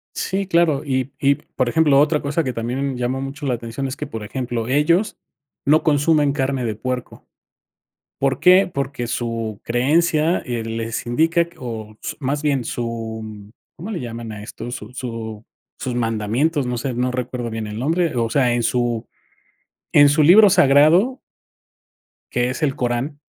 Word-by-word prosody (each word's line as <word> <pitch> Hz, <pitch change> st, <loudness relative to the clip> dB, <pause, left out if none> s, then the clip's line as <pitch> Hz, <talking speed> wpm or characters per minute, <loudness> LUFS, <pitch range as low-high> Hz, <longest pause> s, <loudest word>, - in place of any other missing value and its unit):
Sí, 195 Hz, +1 st, -2 dB
claro, 170 Hz, -6 st, +2 dB
y 130 Hz, -1 st, -1 dB
y 140 Hz, 0 st, +3 dB
por 130 Hz, -2 st, -3 dB
ejemplo, 145 Hz, 0 st, +4 dB
otra 150 Hz, +1 st, +3 dB
cosa 145 Hz, +3 st, -1 dB
que 130 Hz, -2 st, -3 dB
también 125 Hz, +4 st, -2 dB
llama 125 Hz, +2 st, -1 dB
mucho 135 Hz, +2 st, -6 dB
la 130 Hz, -, +1 dB
atención 120 Hz, +3 st, -4 dB
es 130 Hz, -, -5 dB
que, 150 Hz, -, -5 dB
por 110 Hz, -5 st, -6 dB
ejemplo, 120 Hz, 0 st, -3 dB
ellos 170 Hz, -, +2 dB, 0.5 s
no 155 Hz, +3 st, +4 dB
consumen 145 Hz, -1 st, +3 dB
carne 135 Hz, -3 st, -1 dB
de 110 Hz, -, -2 dB
puerco, 125 Hz, +3 st, -5 dB, 0.9 s
¿por 135 Hz, -1 st, +1 dB
qué? 185 Hz, +2 st, +6 dB
Porque 140 Hz, -4 st, -3 dB
su 115 Hz, -3 st, -3 dB
creencia, 155 Hz, +7 st, +2 dB
eh, 120 Hz, -3 st, -3 dB
les 115 Hz, +1 st, -4 dB
indica 165 Hz, +7 st, +2 dB
que, -, -, -23 dB
o 110 Hz, -3 st, -7 dB
s -, -, -4 dB
más 145 Hz, +1 st, -1 dB
bien 140 Hz, -4 st, +1 dB
su, 110 Hz, -3 st, -5 dB, 0.2 s
¿cómo 195 Hz, +7 st, -7 dB
le 185 Hz, -, -3 dB
llaman 115 Hz, -2 st, -6 dB
a 105 Hz, -1 st, -8 dB
esto? 115 Hz, +3 st, -7 dB
Su 110 Hz, -2 st, -7 dB
su 115 Hz, -4 st, -6 dB, 0.4 s
sus 125 Hz, -2 st, -3 dB
mandamientos, 120 Hz, +6 st, 0 dB
no 125 Hz, -1 st, -2 dB
sé, 130 Hz, +2 st, -3 dB
no 125 Hz, +1 st, 0 dB
recuerdo 125 Hz, -1 st, -3 dB
bien 110 Hz, -1 st, -4 dB
el 105 Hz, +1 st, -6 dB
nombre, 165 Hz, +3 st, 0 dB
o 115 Hz, -1 st, 0 dB
sea, 125 Hz, -1 st, +2 dB
en 120 Hz, -, 0 dB
su 120 Hz, -1 st, 0 dB, 0.9 s
en 145 Hz, 0 st, +7 dB
su 150 Hz, +2 st, +3 dB
libro 200 Hz, +7 st, +8 dB
sagrado 165 Hz, -, +5 dB, 1.1 s
que 125 Hz, 0 st, +1 dB
es 130 Hz, -, -5 dB
el 140 Hz, -4 st, +1 dB
Corán, 125 Hz, +4 st, -2 dB
130 Hz, 170 wpm, -21 LUFS, 115-150 Hz, 1.1 s, libro